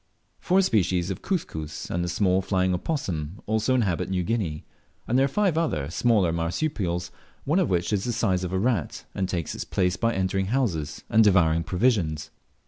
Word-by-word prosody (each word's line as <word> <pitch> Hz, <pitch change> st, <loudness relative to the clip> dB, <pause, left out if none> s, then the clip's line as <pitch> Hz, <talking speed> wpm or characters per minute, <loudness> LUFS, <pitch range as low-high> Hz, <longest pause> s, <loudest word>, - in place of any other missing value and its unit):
Four 190 Hz, +2 st, +3 dB
species 95 Hz, -, +1 dB
of 95 Hz, -, -5 dB
Cuscus, 80 Hz, -, -4 dB
and 85 Hz, -, -1 dB
the -, -, -2 dB
small 95 Hz, +1 st, +2 dB
flying 95 Hz, -1 st, +1 dB
opossum, 90 Hz, -, -3 dB
also 110 Hz, +4 st, +1 dB
inhabit 100 Hz, -10 st, 0 dB
New 95 Hz, -1 st, 0 dB
Guinea; 90 Hz, -7 st, -2 dB, 0.4 s
and 120 Hz, -, 0 dB
there 135 Hz, +1 st, +5 dB
are -, -, +2 dB
five 180 Hz, +1 st, +1 dB
other 80 Hz, -, -1 dB
smaller 100 Hz, -6 st, +2 dB
marsupials, 85 Hz, -, -2 dB, 0.3 s
one 155 Hz, +7 st, +2 dB
of 185 Hz, -, +1 dB
which 90 Hz, +2 st, 0 dB
is 100 Hz, -2 st, +1 dB
the 120 Hz, -, 0 dB
size 95 Hz, -5 st, 0 dB
of 90 Hz, -, -3 dB
a 95 Hz, -, 0 dB
rat, 105 Hz, -, -1 dB
and 95 Hz, -1 st, -2 dB
takes 85 Hz, -5 st, -2 dB
its -, -, -4 dB
place 90 Hz, -1 st, 0 dB
by 115 Hz, 0 st, 0 dB
entering 95 Hz, 0 st, 0 dB
houses 95 Hz, -, -1 dB
and 110 Hz, +1 st, +5 dB
devouring 85 Hz, -5 st, +4 dB
provisions. 80 Hz, -5 st, 0 dB
95 Hz, 185 wpm, -25 LUFS, 85-115 Hz, 0.4 s, there